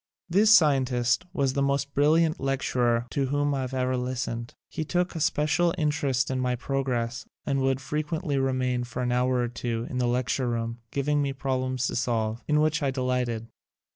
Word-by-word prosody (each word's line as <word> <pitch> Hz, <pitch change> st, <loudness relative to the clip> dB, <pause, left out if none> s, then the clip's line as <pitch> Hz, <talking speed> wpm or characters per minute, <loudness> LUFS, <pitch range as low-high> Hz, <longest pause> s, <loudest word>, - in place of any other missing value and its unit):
This 200 Hz, +5 st, +4 dB
scientist 130 Hz, -, +4 dB
was 135 Hz, -2 st, 0 dB
the 140 Hz, -, 0 dB
most 140 Hz, 0 st, 0 dB
brilliant 155 Hz, +3 st, +3 dB
lecturer 125 Hz, -3 st, +1 dB
to 135 Hz, -1 st, 0 dB
whom 145 Hz, +1 st, +1 dB
I 135 Hz, -1 st, -1 dB
ever 130 Hz, 0 st, -1 dB
listened. 125 Hz, -2 st, -3 dB
He 155 Hz, -, -4 dB
took 175 Hz, +3 st, -1 dB
a 165 Hz, -, -4 dB
special 160 Hz, +2 st, +2 dB
interest 140 Hz, -4 st, 0 dB
in 130 Hz, -, -1 dB
my 125 Hz, -1 st, 0 dB
progress 125 Hz, -2 st, -2 dB, 0.2 s
and 135 Hz, -2 st, 0 dB
would 135 Hz, 0 st, +1 dB
frequently 150 Hz, 0 st, -2 dB
remain 130 Hz, -2 st, 0 dB
for 120 Hz, +1 st, -4 dB
an 125 Hz, -, 0 dB
hour 125 Hz, +1 st, +2 dB
or 120 Hz, -1 st, +1 dB
two 115 Hz, 0 st, -3 dB
in 125 Hz, -, -2 dB
the 125 Hz, -, +1 dB
lecture 125 Hz, +1 st, 0 dB
room, 115 Hz, 0 st, -3 dB
giving 145 Hz, +1 st, 0 dB
me 140 Hz, -1 st, -1 dB
problems 130 Hz, -1 st, -1 dB
to -, -, -2 dB
solve, 115 Hz, -1 st, -1 dB
in 150 Hz, 0 st, +3 dB
which 155 Hz, 0 st, +1 dB
I 140 Hz, -, +1 dB
delighted. 125 Hz, -3 st, -1 dB
130 Hz, 180 wpm, -27 LUFS, 125-145 Hz, 0.2 s, This